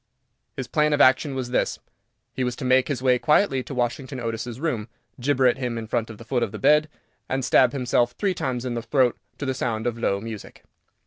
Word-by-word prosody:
His 130 -3 -4
plan 150 +4 +2
of 145 - +1
action 135 +2 +4
was 125 -2 -4
this. - - 0 0.6
He 130 - -2
was 125 -1 -1
to 130 - -6
make 130 0 +4
his 130 -4 -3
way 125 -1 +4
quietly 150 -2 +3
to 135 - -8
Washington 125 +2 -2
Otis's 115 +1 -4
room, 125 -9 -2 0.3
gibber 130 +1 +2
at 125 +1 +3
him 115 -3 -3
from 115 0 -1
the 110 0 -11
foot 125 +1 0
of - - -1
the 110 - -6
bed, 150 +8 +4 0.4
and 130 -1 -1
stab 125 0 +5
himself 120 -2 +1
three 200 -2 0
times 130 -7 -3
in 125 - -2
the 120 - -2
throat 125 +1 +2 0.2
to 145 - -4
the 135 - 0
sound 115 -4 -2
of 120 -1 -2
low 100 -4 0
music. 110 0 -9
125 Hz, 215 wpm, -24 LUFS, 120-135 Hz, 0.6 s, stab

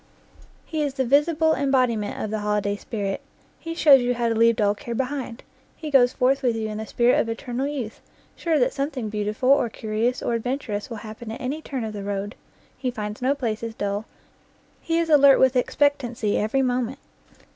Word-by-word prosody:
He 315 -1 -3
is 285 -2 -1
the 265 -2 0
visible 305 +4 +3
embodiment 255 -7 +1
of 215 - -3
the 215 - -1
holiday 210 -1 0
spirit; 200 -2 -4 0.4
he 330 0 -6
shows 285 -5 +7
you 245 0 0
how 235 -1 0
to - - +1
leave 230 +1 +4
dull 205 -3 +2
care 235 +3 -6
behind; 260 -2 -3 0.3
he 310 -2 -6
goes 250 -3 +5
forth 265 +1 +1
with 245 -3 +1
you 220 -1 -3
in 215 0 -5
the 220 - -5
spirit 240 +1 +3
of 230 - 0
eternal 245 +3 -3
youth, 260 -7 -5 0.3
sure 330 -2 0
that 255 -1 +2
something 275 -5 -3
beautiful 210 +4 -1
or 275 -4 +4
curi 220 +1 -1
ous 250 - -6
or - - 0
adventurous 230 -3 -3
will 230 - -6
happen 220 +1 -8
at 225 - -6
any 280 +5 -3
turn 265 -5 -4
of 220 -1 -4
the 205 - -5
road. 200 +1 -3 0.4
He 255 - -3
finds 210 -2 -5
no 265 +3 +2
places 230 -3 -3
dull, 205 +1 -2 0.8
he 330 0 -1
is 335 0 +1
alert 280 -2 +7
with 260 0 +4
expect 285 +3 +2
ancy 230 -4 -2
every 245 +6 +1
moment. 250 0 -1
245 Hz, 200 wpm, -24 LUFS, 215-275 Hz, 0.8 s, shows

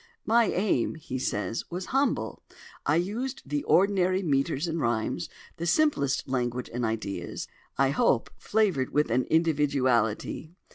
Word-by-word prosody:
"My 230 +1 +4
aim," 180 - +1
he 130 -5 -5
says, 115 -1 -2
"was 180 +2 -4
humble. 275 +1 0 0.5
I 150 - +4
used 215 +10 -2
the 145 +1 -1
ordinary 190 0 +3
metres 140 0 +1
and 165 -1 -2
rhymes, 115 -3 -1 0.3
the 170 - -3
simplest 175 - +2
language 125 -1 -2
and 120 +1 -2
ideas, 105 -6 -3 0.3
I 135 -1 +3
hope, 235 - +2
flavoured 195 -12 +1
with 150 -5 +1
an 125 +2 +1
individuality. 145 -3 +1
150 Hz, 135 wpm, -28 LUFS, 125-185 Hz, 0.5 s, My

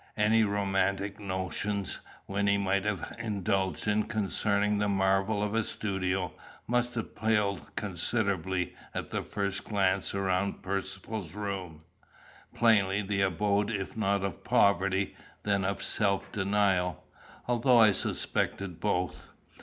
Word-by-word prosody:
Any 110 +1 +4
romantic 100 0 0
notions 100 +1 -2 0.3
Wynnie 100 +1 +2
might 100 0 +1
have 105 -5 -2
indulged 100 -5 -1 0.2
concerning 105 -1 +1
the 105 - +1
marvels 95 +2 +2
of 105 - -3
a 115 0 +2
studio, 95 -4 -1 0.3
must 120 0 0
have 115 - -4
paled 105 -3 0
considerably 95 -2 0 0.2
at - - -4
the - - -1
first 100 -1 -3
glance 100 -2 +1
around 95 0 0
Percivale's 100 -1 -4
room 95 -6 -5 0.7
plainly 105 -3 +3
the 100 0 -1
abode 100 +2 +1
if 95 -4 -3
not 100 -2 +1
of 95 -5 -4
poverty, 100 0 +2 0.3
then 100 -1 +1
of 100 +1 -2
self 100 -2 +1
denial, 95 -3 +1 0.4
although 120 +1 +4
I 110 -2 +8
suspected 95 -2 -1
both. 90 -1 -1
100 Hz, 120 wpm, -30 LUFS, 95-105 Hz, 0.7 s, I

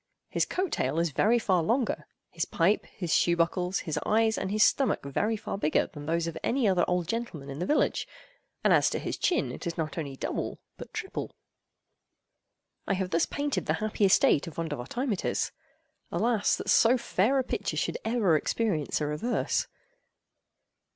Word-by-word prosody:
His - - 0
coat 370 0 -1
tail 135 +5 -1
is 170 -1 +1
very 220 - +3
far 190 -6 +2
longer—his 215 -5 -2
pipe, 180 +6 +1
his 175 -4 -3
shoe 170 - +4
buckles, 180 +2 0
his 155 - -2
eyes, 220 +1 +2
and 190 - -3
his 215 +2 +3
stomach, 270 - +2
very 210 +11 0
far 195 - -5
bigger—than 150 -3 0
those 165 +1 +1
of 165 - -4
any 250 -2 +1
other 185 -3 +3
old 180 -2 0
gentleman 180 -11 -4
in 135 - -6
the 180 - -2
village; 300 - +1 0.6
and - - +5
as - - +4
to - - -2
his - - -3
chin, 350 - +1
it - - -6
is 170 - -4
not 160 0 -3
only 140 -4 -5
double, - - -3 0.2
but - - -10
triple. 435 -3 -5 1.5
I 195 - +2
have 185 -1 -2
thus 165 0 +2
painted 285 -1 -2
the - - +2
happy 215 -1 -2
estate 180 -4 +4
of 165 - -8
Vondervotteimittiss: 180 - -2 0.6
alas, 230 -3 +2
that - - -2
so 240 +3 +5
fair 235 +3 +1
a 265 - +2
picture - - -3
should - - -1
ever 220 -7 +2
experience 160 -3 0
a - - +1
reverse! 150 +12 -1
190 Hz, 170 wpm, -28 LUFS, 165-230 Hz, 1.5 s, and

